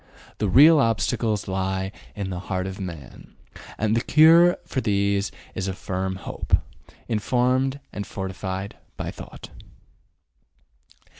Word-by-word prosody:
The 105 - 0
real 150 - +7
obstacles 110 -2 0
lie 95 0 -2 0.2
in 100 -2 -4
the 90 - -4
heart 90 -1 -3
of 95 +1 -6
man, 85 -8 -9 0.4
and 110 +1 +1
the 115 - +2
cure 165 +5 +6
for 130 - -2
these 100 -2 +1 0.2
is 95 - -3
a 95 - -2
firm 95 0 -3
hope, 95 - -1 0.5
informed 125 +4 +1
and 100 - -5
fortified 95 0 -5 0.2
by - - -4
thought. - - -11
100 Hz, 125 wpm, -24 LUFS, 95-120 Hz, 0.5 s, real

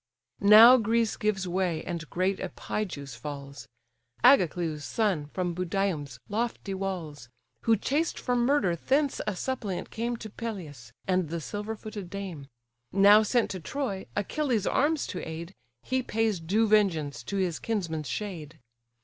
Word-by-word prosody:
Now 220 +5 +10
Greece 230 -1 +1
gives 195 -3 -1
way, 175 -3 -1
and 165 -3 -5
great 185 +2 0
Epigeus 145 - -4
falls; 140 +1 -8 0.6
Agacleus' 175 - +4
son, 190 -9 0
from 180 +3 -2
Budium's 175 -7 -2
lofty 220 -2 -2
walls; 170 -10 -5 0.4
Who 225 -1 +4
chased 300 +10 0
for 250 - -1
murder 240 -7 +2
thence 275 - +1
a 210 - -1
suppliant 215 -4 -3
came 235 +1 -2
To 220 -2 -9
Peleus, 160 - -7 0.2
and 185 -4 +1
the 170 +1 -3
silver 210 +6 -5
footed 210 -4 -8
dame; 185 -8 -6 0.4
Now 200 +2 +7
sent 230 +2 +1
to 185 - -4
Troy, 200 - -4
Achilles' 230 0 0
arms 295 +2 +1
to 180 - -5
aid, 165 +3 -7 0.3
He 260 0 0
pays 225 -5 0
due 205 +8 +1
vengeance 165 - +2
to 200 - -3
his 180 -4 0
kinsman's 165 -9 -3
shade. 165 -7 -5
195 Hz, 140 wpm, -28 LUFS, 165-225 Hz, 0.6 s, Now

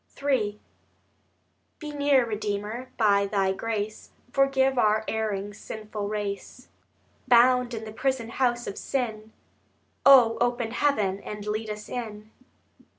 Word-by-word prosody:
III 225 -7 0 1.2
Be 300 -2 -7
near, 285 -3 +3
Redeemer; 210 +3 -4
by 200 -3 +3
Thy 195 -2 +1
grace 215 +1 -4 0.2
Forgive 270 -1 +2
our 215 0 +3
erring 205 -2 -2
sinful 210 0 -6
race, 210 +4 -5 0.6
Bound 250 0 +5
in 220 0 -6
the 215 - -7
prison 250 -1 -1
house 240 0 0
of 195 - -6
sin— 220 -5 -3 0.7
O, 250 -5 +7
open 240 -1 0
heaven 215 -8 +1
and 210 0 -7
lead 215 +1 -3
us 210 0 -6
in. 215 -3 -6
220 Hz, 120 wpm, -26 LUFS, 210-250 Hz, 1.2 s, O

